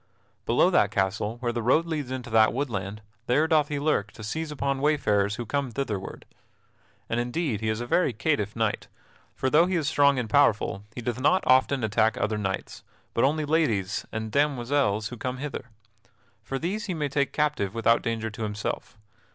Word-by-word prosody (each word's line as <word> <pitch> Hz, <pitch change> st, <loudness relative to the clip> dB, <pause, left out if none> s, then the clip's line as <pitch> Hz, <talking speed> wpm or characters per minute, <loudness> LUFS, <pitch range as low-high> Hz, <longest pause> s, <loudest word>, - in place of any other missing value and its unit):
Below -, -, +4 dB
that -, -, +4 dB
castle, 105 Hz, +4 st, -1 dB
where 120 Hz, -1 st, 0 dB
the 120 Hz, 0 st, -3 dB
road 130 Hz, +8 st, +3 dB
leads 155 Hz, -6 st, -3 dB
into 130 Hz, -2 st, -5 dB
that 110 Hz, -1 st, +5 dB
woodland, 105 Hz, -6 st, -3 dB, 0.2 s
there 150 Hz, +6 st, +3 dB
doth 155 Hz, -3 st, +3 dB
he 145 Hz, -2 st, -3 dB
lurk 140 Hz, -10 st, 0 dB
to 110 Hz, -, -10 dB
seize 160 Hz, +9 st, -3 dB
upon 140 Hz, -2 st, -2 dB
wayfarers 105 Hz, -9 st, +2 dB
who 120 Hz, -, -5 dB
come 140 Hz, +3 st, -1 dB
thitherward. 110 Hz, -6 st, -4 dB, 0.8 s
And 115 Hz, -, -1 dB
indeed 120 Hz, -, -1 dB
he 110 Hz, -, -1 dB
is 110 Hz, +1 st, -1 dB
a -, -, -3 dB
very 160 Hz, +4 st, +2 dB
catiff 110 Hz, -3 st, -1 dB
knight, 110 Hz, -2 st, -1 dB, 0.5 s
for, 130 Hz, -, -1 dB
though 165 Hz, +3 st, +5 dB
he 185 Hz, -, -1 dB
is 160 Hz, -4 st, 0 dB
strong 140 Hz, -2 st, +4 dB
and 125 Hz, -3 st, -1 dB
powerful, 110 Hz, -6 st, +2 dB
he 125 Hz, -, -5 dB
doth 120 Hz, +1 st, -3 dB
not 185 Hz, +7 st, +3 dB
often 130 Hz, 0 st, +3 dB
attack 110 Hz, +1 st, +2 dB
other 105 Hz, +1 st, -1 dB
knights, 95 Hz, -2 st, -4 dB, 0.3 s
but 115 Hz, -, +1 dB
only 150 Hz, +3 st, +2 dB
ladies 125 Hz, -, 0 dB
and 110 Hz, 0 st, -4 dB
demoiselles 130 Hz, -6 st, +1 dB
who 125 Hz, -, -8 dB
come 125 Hz, +2 st, -3 dB
hither. 145 Hz, -1 st, -5 dB, 0.8 s
For 135 Hz, -, -4 dB
these 195 Hz, -, -3 dB
he 185 Hz, -, -2 dB
may 150 Hz, -2 st, -1 dB
take 140 Hz, 0 st, 0 dB
captive 150 Hz, -10 st, 0 dB
without 115 Hz, 0 st, +3 dB
danger 115 Hz, -2 st, -2 dB
to 110 Hz, -, -9 dB
himself. 105 Hz, +2 st, -4 dB
125 Hz, 190 wpm, -26 LUFS, 110-145 Hz, 0.8 s, that